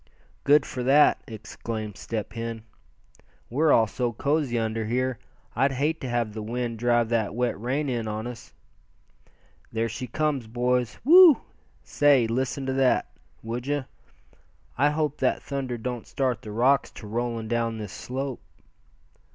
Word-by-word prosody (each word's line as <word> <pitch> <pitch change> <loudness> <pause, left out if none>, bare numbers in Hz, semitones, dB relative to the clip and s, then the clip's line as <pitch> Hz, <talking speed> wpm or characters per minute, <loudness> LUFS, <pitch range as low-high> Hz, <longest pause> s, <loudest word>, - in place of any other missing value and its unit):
"Good 145 0 +5
for 125 - -5
that!" 140 +4 +5
exclaimed 110 -1 -6
Step 110 -3 -5
Hen. 115 -1 -5 0.9
"We're 150 +5 +3
all 115 - +5
so 120 +2 -2
cozy 140 0 0
under 110 -1 -1
here, 125 +1 -1 0.4
I'd 135 +3 +2
hate 150 +5 -1
to 130 - -4
have 120 -3 -1
the 110 - -5
wind 115 +1 -3
drive 120 -1 +2
that 110 -3 0
wet 120 -3 -1
rain 135 +5 -1
in 120 -4 -2
on 110 +1 -3
us. 120 -1 -8 1.2
There 115 0 0
she 115 +3 -5
comes, 140 -2 -1
boys. 125 +1 0
Whew! 335 +1 +8 0.4
say, 145 -5 +4
listen 130 +4 -2
to 130 - -1
that, 130 -1 +2 0.3
would 120 +3 -4
you? 145 -2 -1 0.9
I 145 +3 +3
hope 150 -1 -1
that - - +1
thunder 135 -3 -3
don't 120 0 -5
start 125 -4 -1
the 110 - -8
rocks 130 +6 +3
to 110 - -10
rolling 115 +1 -3
down 115 -1 -1
this 105 -2 -7
slope." 130 +4 -5
120 Hz, 150 wpm, -26 LUFS, 115-135 Hz, 1.2 s, Whew